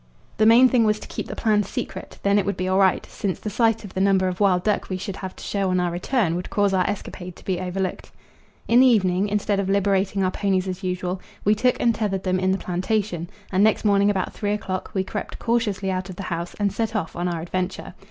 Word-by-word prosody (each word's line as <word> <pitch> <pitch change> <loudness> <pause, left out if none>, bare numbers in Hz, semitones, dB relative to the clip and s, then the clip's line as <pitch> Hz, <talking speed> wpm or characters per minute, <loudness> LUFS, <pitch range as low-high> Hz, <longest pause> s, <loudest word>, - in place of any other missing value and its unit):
The 215 - +4
main 240 +3 +8
thing 245 -2 +3
was 215 -1 +2
to - - -10
keep - - -5
the - - -6
plan 215 -2 +2
secret, 200 - -6
then 200 +1 +4
it 195 - -1
would 200 - -1
be 185 - -2
all 190 +1 +2
right, 190 -2 +3
since 195 -4 -4
the 210 - -5
sight 225 +1 +2
of 190 - -10
the 190 - -1
number 190 -1 +3
of 180 -1 -3
wild 185 -3 +3
duck 210 -1 0
we 185 - -2
should 195 +1 -5
have 190 -1 -6
to - - -11
show 195 -2 -1
on 185 0 +2
our 175 -1 0
return 180 +1 0
would 180 +1 -4
cause 205 -1 +1
our 185 -1 +2
escapade 180 -3 -6
to - - -17
be 185 -2 -1
overlooked. 185 0 -3 0.6
In 235 +1 +5
the 260 - +7
evening, 195 -4 +3
instead 205 0 0
of 195 -1 -1
liberating 195 0 +1
our 185 - +1
ponies 190 -1 0
as 185 0 -4
usual, 180 0 -3 0.2
we 210 - +5
took 250 +4 +1
and 235 - +3
tethered 200 -4 -2
them 185 0 +1
in 185 0 +1
the 190 - +1
plantation, 180 -1 -2 0.2
and 195 +1 +3
next 215 +1 +2
morning 200 0 +4
about 195 -2 -1
three 205 -1 -1
o'clock 190 -3 -3
we 190 - +1
crept - - -5
cautiously 210 -5 0
out 185 +1 -3
of 185 - -7
the 195 - -6
house 170 +1 -5
and 200 -2 +1
set 225 -1 -2
off 185 -6 -2
on 175 +1 -1
our 170 -2 -2
adventure. 180 +2 -4
195 Hz, 250 wpm, -23 LUFS, 185-210 Hz, 0.6 s, main